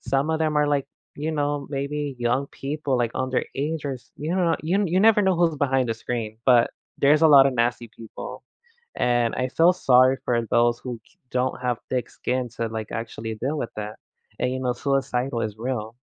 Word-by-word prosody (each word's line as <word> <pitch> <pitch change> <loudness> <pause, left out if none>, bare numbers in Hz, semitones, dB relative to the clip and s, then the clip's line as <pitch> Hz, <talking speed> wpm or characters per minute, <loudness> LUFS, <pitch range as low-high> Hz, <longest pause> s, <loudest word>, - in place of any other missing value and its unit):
some 135 +3 0
of 160 - 0
them 155 -1 0
are 150 0 +3
like, 140 -2 0 0.3
you 155 +2 -3
know, 145 -2 -1
maybe 140 0 -3
young 120 +3 0
people 140 -1 -3
like 120 -1 0
underage 140 +4 -2
or 140 -2 -2
s 125 - -14
you 155 +5 -3
don't - - 0
kno 165 -1 +2
you 165 +4 0
n 205 - +2
you 180 +2 +1
never 215 0 +6
know 190 -2 +3
who's 165 -3 +2
behind 135 -3 +1
the 115 - 0
screen, 110 -1 -4
but 120 -2 +5 0.3
there's 150 +2 +4
a 160 - +7
lotta 140 -2 +7
nasty 120 -2 0
people, 115 0 -9 0.5
and 120 -1 +1
I 130 - 0
feel 165 +6 +5
sorry 130 -4 +4
for 120 -2 +1
those 120 0 +3
who 125 -3 -6
d 185 - -28
don't 125 0 -1
have 125 -2 0
thick 125 -1 -2
skin 125 -1 -2
to 115 - -1
like, 110 -1 -6
actually 115 -1 -5
deal 140 +8 -2
with 120 - -3
that, 105 0 -5 0.4
and 125 - 0
you 130 - -3
know 125 -1 0
suicidal 130 -2 -1
is 105 -1 -3
real. 115 -2 -4
130 Hz, 210 wpm, -24 LUFS, 120-145 Hz, 0.5 s, a